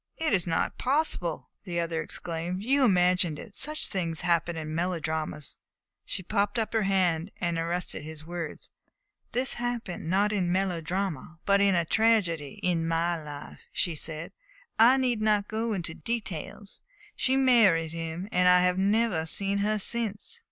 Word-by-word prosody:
"It 320 -7 0
is 180 -3 +2
not 165 - -1
possible!" 255 - +1
the 175 -4 -3
other 165 -1 -1
exclaimed. 170 +4 -4
"You 270 +4 +3
imagined 180 -6 +3
it. 205 - -10
Such 305 +8 -2
things 170 -4 -2
happen 170 -1 +1
in 155 -1 -5
melodramas 160 -4 -3 0.2
" - - -62
She 185 - -4
put 205 +5 0
up 225 -1 -1
her 225 - +2
hand 185 -3 +1
and 170 -2 -1
arrested 170 0 -2
his 155 0 -9
words. 170 -2 -6 0.6
"This 255 +2 0
happened 240 -9 -4
not 200 +3 +2
in 200 -4 +1
a - - -1
melodrama, 180 -2 -2
but 200 0 +4
in 200 -2 +4
a 170 -1 +2
tragedy 185 -8 +1
in 170 -2 +1
my 165 +1 +1
life," 145 -1 -9
she 175 - 0
said. 155 +1 -3 0.5
"I 240 +4 +7
need 250 -4 +1
not 210 -1 +2
go 225 +1 -2
into 175 -5 -2
details. 205 -2 -5 0.3
She 265 +1 +1
married 215 -12 +4
him, 165 +3 -5
and 180 0 +3
I 180 0 +7
have 180 +1 +2
never 200 -4 +2
seen 200 +4 0
her 215 +1 +1
since." 230 - -1
180 Hz, 165 wpm, -28 LUFS, 165-215 Hz, 0.6 s, I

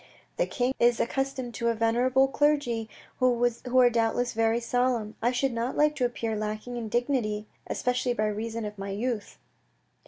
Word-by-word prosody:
"The - - +1
King 250 0 0
of 235 - +6
is 240 -1 +1
accustomed 265 -1 -2
to 235 - -2
a 230 - +2
venerable 245 +4 +3
clergy 270 -6 +1 0.3
who 245 0 +1
are 245 -1 +7
doubtless 235 +1 +1
very 225 +1 +2
solemn. 240 -2 0
I 240 +2 +2
should 255 +1 0
not 235 +2 -2
like 300 0 +3
to 250 - +2
appear 230 -2 -2
lacking 215 +3 -4
in 230 -2 -4
dignity, 235 -3 0 0.2
especially 250 0 0
by 215 - +1
reason 220 +2 -3
of 210 -1 -7
my 195 0 -5
youth." 215 +1 -3
240 Hz, 175 wpm, -27 LUFS, 225-255 Hz, 0.3 s, are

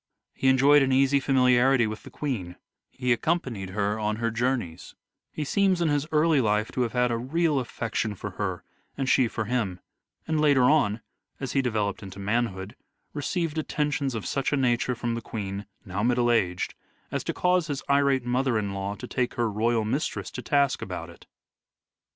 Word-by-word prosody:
He 135 - -1
enjoyed 140 +3 +6
an 135 -1 +2
easy 135 +1 +4
familiarity 130 -2 +4
with 110 0 -5
the - - -12
Queen; 105 -12 -4 0.3
he 125 -1 0
accompanied 120 - -2
her 105 +2 -1
on 105 0 0
her 115 +1 -1
journeys; 115 -8 -2 0.4
he 155 - -4
seems 190 +3 +2
in 170 -2 +2
his 145 0 0
early 155 -2 +4
life 105 -1 +1
to 125 - -2
have 120 -2 -1
had 125 -1 +2
a 115 - 0
real 150 +3 +1
affection 115 -3 -3
for 100 +1 -6
her 95 -2 -3 0.3
and 135 -1 -1
she 130 -1 +4
for 110 -1 -3
him; 105 -6 -1 0.5
and, 160 -1 +1
later 140 -4 +4
on, 125 -6 +3 0.4
as 135 -3 -4
he 135 - +2
developed 110 -5 -1
into 95 -1 -9
manhood, 100 0 -2 0.4
received 160 +1 -2
attentions 145 -4 -1
of 110 - -4
such 135 -1 -1
a 145 - +2
nature 125 -1 +1
from 120 0 -2
the 115 - -3
Queen, 100 -2 -5 0.2
now 95 +2 -3
middle 120 +1 +2
aged, 90 -6 0 0.4
as - - -2
to - - 0
cause 180 -2 +1
his 145 -3 -3
irate 140 -2 +3
mother 125 -1 +1
in 100 -2 -2
law 100 +1 -3
to 125 - -8
take 125 0 -2
her 120 -3 0
royal 110 +1 +1
mistress 130 +8 -2
to - - -6
task 140 -2 +1
about - - -6
it. - - -18
125 Hz, 185 wpm, -26 LUFS, 105-140 Hz, 0.5 s, enjoyed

